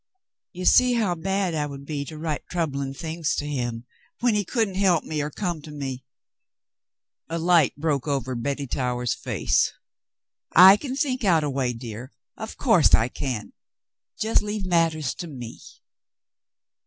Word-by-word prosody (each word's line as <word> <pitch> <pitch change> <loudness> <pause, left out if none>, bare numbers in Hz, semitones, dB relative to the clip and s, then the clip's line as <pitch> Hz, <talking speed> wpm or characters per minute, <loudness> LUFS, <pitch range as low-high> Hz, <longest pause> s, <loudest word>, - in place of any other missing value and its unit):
You 185 +1 -6
see 250 +4 +5
how 220 -7 +1
bad 190 +1 -1
I 150 -2 -1
would 140 -1 -9
be 145 -1 -4
to 155 +2 -9
write 155 -1 -4
troubling 140 -6 -2
things 160 +2 -3
to 145 - -3
him 120 -5 -3 0.3
when 240 -1 +2
he 210 -1 +1
couldn't 220 0 -1
help 185 -4 +2
me 155 -1 -3
or 150 - -2
come 175 0 -3
to 155 - -11
me. 135 -3 -5 0.6
" - - -67
A 165 - -2
light 165 -3 +3
broke 145 -2 -1
over 135 -3 -1
Betty 140 +4 -3
Towers's 125 -2 -1
face. - - 0 0.8
"I 190 +3 +10
can 260 +4 -5
think 270 -4 -1
out 170 -6 +3
a 145 - -1
way, 130 -2 0
dear, 115 +1 -8 0.2
of - - -8
course - - +5
I 115 +3 0
can. 125 -5 -4 0.7
Just 220 +1 +2
leave 210 -1 -4
matters 165 -6 +1
to 175 - -7
me." 125 -6 -8
155 Hz, 165 wpm, -24 LUFS, 135-185 Hz, 0.8 s, I